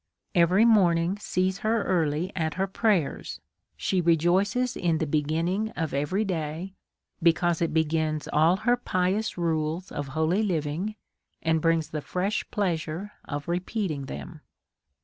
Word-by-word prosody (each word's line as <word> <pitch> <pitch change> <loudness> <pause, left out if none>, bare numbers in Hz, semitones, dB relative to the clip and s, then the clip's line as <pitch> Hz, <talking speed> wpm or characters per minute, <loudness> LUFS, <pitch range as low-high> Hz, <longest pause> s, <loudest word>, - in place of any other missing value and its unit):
Every 180 +4 +5
morning 185 -4 +3
sees 185 -1 -1
her 220 -1 +1
early 165 0 0
at 160 -3 -1
her 190 +2 +1
prayers. 195 -5 0 0.4
She 185 -2 0
rejoices 180 +9 +2
in 170 -3 +1
the 160 - -1
beginning 160 +8 0
of 160 -2 -2
every 175 +10 0
day, 170 0 -3 0.5
because 170 0 +3
it 165 - +1
be 160 0 +3
gins 155 -1 -1
all 160 +4 +5
her 245 0 +4
pious 190 -1 -1
rules 165 +1 -1
of 145 -1 -4
holy 165 +6 +2
living, 175 +1 -1 0.5
and 160 -1 +2
brings 165 -2 +2
the 155 - -3
fresh 190 +7 -1
pleasure 175 0 -2
of 145 0 -5
repeating 175 -5 -2
them. 70 - -8
170 Hz, 140 wpm, -27 LUFS, 155-195 Hz, 0.5 s, Every